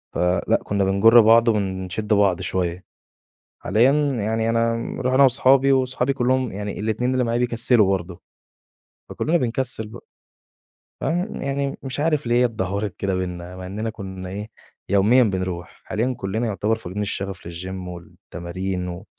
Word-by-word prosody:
فلأ، 90 +1 +1
كُنّا 100 -1 0
بنجُرّ 105 +5 +6
بعض 115 +2 +5
ونشِدّ 100 0 -1
بعض 100 -4 +3
شوية. 90 -1 -2 0.8
حاليًا 120 +5 +4 0.3
يعني 110 +2 0
أنا 115 0 +1 0.3
رُحنا 130 +2 +4
وأصحابي 135 +1 +4
وأصحابي 130 0 +1
كلّهم 130 -1 0
يعني 100 +1 -5
ال2 110 +4 -1
اللي 130 -1 +1
معايا 120 0 0
بيكسلوا 120 -3 +3
برضه، 90 -2 -2 0.9
فكُلّنا 165 +3 0
بنكسّل 120 -4 -2
بقى. 115 +2 -12 0.9
فيعني 175 -1 -2
يعني 140 0 -2
مش 135 +1 -5
عارف 150 -2 +1
ليه 120 - +2
هي - - +5
اتدهورت 100 -3 -3
كده 95 -1 -1
بيننا! 90 -1 -5
مع 95 - -8
إننا 105 +4 -4
كُنّا 95 -4 -7
إيه، 105 +3 -6 0.4
يوميًا 105 +6 +5
بنروح، 95 -4 -3
حاليًا 120 +4 -1
كُلنّا 110 +5 -2
يُعتبر 110 +1 0
فاقدين 105 -2 -6
الشّغف 100 -3 -3
للGym 90 +2 -6
والتمارين 90 +1 -6
و 90 +4 -7
105 Hz, 145 wpm, -22 LUFS, 95-125 Hz, 0.9 s, بنجُرّ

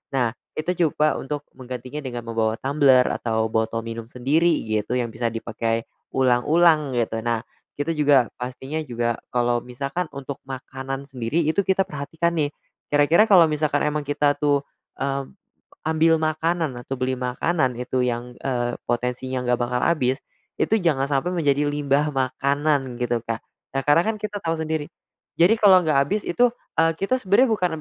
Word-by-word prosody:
Nah, 120 -3 +2 0.2
itu 155 +3 -1 0.2
coba 150 0 +1
untuk 145 +1 -4
menggantinya 130 +2 -7
dengan 120 -3 -5
membawa 110 -1 0
tumbler 135 -2 +4
atau 110 -1 0
botol 110 +1 0
minum 115 0 -6
sendiri 145 +8 +2 0.2
gitu, 110 +2 -1
yang 120 - -1
bisa 115 0 -2
dipakai 115 0 -2 0.2
ulang-ulang 145 +4 +3
gitu. 115 -2 -1
Nah, 115 -1 0 0.4
kita 165 +3 -1
juga 145 -5 +4
pastinya 130 +5 -5
juga 120 -3 -1 0.2
kalau 120 -1 +1
misalkan 140 +7 -4
untuk 140 0 -7
makanan 135 +1 -6
sendiri 130 +3 -2
itu 180 +6 +2
kita 190 0 +1
perhatikan 160 +3 -2
nih, 150 -3 0 0.4
kira-kira 145 +6 +5
kalau 175 -4 +8
misalkan 150 -1 0
emang 150 0 -1
kita 145 0 +1
tuh, 145 -1 +2 0.4
mmm, 135 0 -2 0.6
ambil 160 0 +3
makanan 160 -1 0
atau 135 +1 -5
beli 130 0 0
makanan 125 +1 -1
itu 125 +1 -1
yang, 120 0 -3
eee, 120 -2 -1
potensinya 125 +2 -2
nggak 125 - +3
bakal 125 +1 -1
habis, 135 -4 +1 0.4
itu 220 - +2
jangan 140 -5 +2
sampai 140 +5 0
menjadi 145 -5 +1
limbah 145 0 +1
makanan 135 0 0
gitu, 120 -2 -1
Kak. 115 -1 -3 0.3
Nah, 135 - -1
karena 145 +3 +5
kan 220 +1 -2
kita 205 -1 -5
tahu 165 -1 -1
sendiri. 160 0 -3 0.5
Jadi 180 +7 +6
kalau 200 -4 +6
nggak 160 -4 0
habis 210 +9 -1
itu, 240 +7 +3 0.2
eee, 165 0 +4
kita 200 +6 +1
sebenarnya 235 +2 +3
bukan 185 -5 +1
140 Hz, 160 wpm, -23 LUFS, 125-160 Hz, 0.6 s, kalau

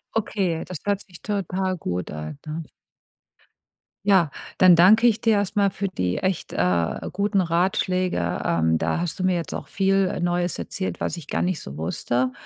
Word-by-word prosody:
Okay, 195 -6 -1
das 180 - -6
hört 200 -1 0
sich 180 -4 -15
total 190 -2 -2
gut 90 - -4
an, 75 -1 -6
ne? 155 +2 -4 1.4
Ja. 190 -7 +4 0.3
Dann 185 -2 +7
danke 210 +8 +6
ich 225 -1 +2
dir 225 -1 +3
erstmal 200 0 +2
für 200 +1 -3
die 90 - -2
echt, 185 -1 -2
äh, 85 -2 +1
guten 200 +1 +1
Ratschläge. 180 - 0
Ähm, 80 -1 +2
da - - -1
hast 175 +1 -3
du - - -1
mir 185 -1 +2
jetzt 170 -1 -3
auch - - -5
viel, 195 0 +2
äh, - - -3
Neues 175 0 0
erzählt, 190 - -4
was - - -2
ich 160 -4 -9
gar - - -1
nicht 180 -2 -1
so 70 - -9
wusste. 120 +10 -1
180 Hz, 180 wpm, -24 LUFS, 130-195 Hz, 1.4 s, Dann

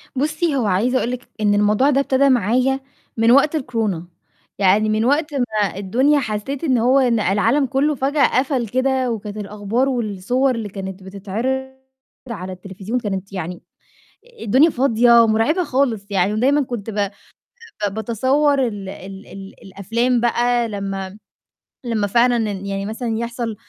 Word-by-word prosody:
بُصّي، 305 +3 0
هو 255 -4 0
عايزة 210 +7 +1
أقول 245 - -1
لِك 250 -1 -7
إن 205 -1 +3
الموضوع 210 +7 +3
ده 275 -1 +2
ابتدا 275 0 +2
معايا 255 +3 +2 0.4
من 225 +1 +4
وقت 285 +4 +4
الكورونا، 225 - -2 0.5
يعني 205 +2 +3
من 215 +1 +1
وقت 295 +4 +1
ما 215 -8 -1
الدنيا 255 +10 +2
حسّيت 250 +4 -4
إن 265 -6 +2
هو 255 +4 +3
إن 240 -3 +2
العالم 220 +8 +2
كلّه 280 +3 0
فجأة 275 0 +2
قَفل 260 -3 -1
كده 260 +1 0
وكانت 210 -2 -5
الأخبار 210 +5 -1
والصور 245 +2 0
اللي 220 -3 -4
كانت 190 -1 -7
بتتعِرض 225 +8 -4 0.6
على 190 -5 -6
التليفزيون 195 +6 -5
كانت 195 -2 -5
يعني 180 -1 -5 0.8
الدنيا 265 +10 +4
فاضية 235 -3 +4
ومُرعبة 225 +11 +2
خالص 255 -8 0
يعني 195 0 +1
ودايمًا 270 +7 +2
كنت 235 -5 -5
ب 210 - -6
آآ 200 -1 0 0.8
ب 195 - -9
باتصوّر 260 +6 +1
ال 205 -4 -6
ال 195 +1 -9
ال 195 0 -11
الأفلام 230 +6 -1
بقى 240 0 +1
لمّا 195 -2 -4
م 195 +3 -14 0.7
لمّا 220 -4 0
فعلًا 240 +4 +3 0.2
إن 195 0 -6
يعني 195 0 -3
مثلًا 225 +1 -3
يحصل 235 -1 -4
230 Hz, 155 wpm, -20 LUFS, 200-260 Hz, 0.8 s, من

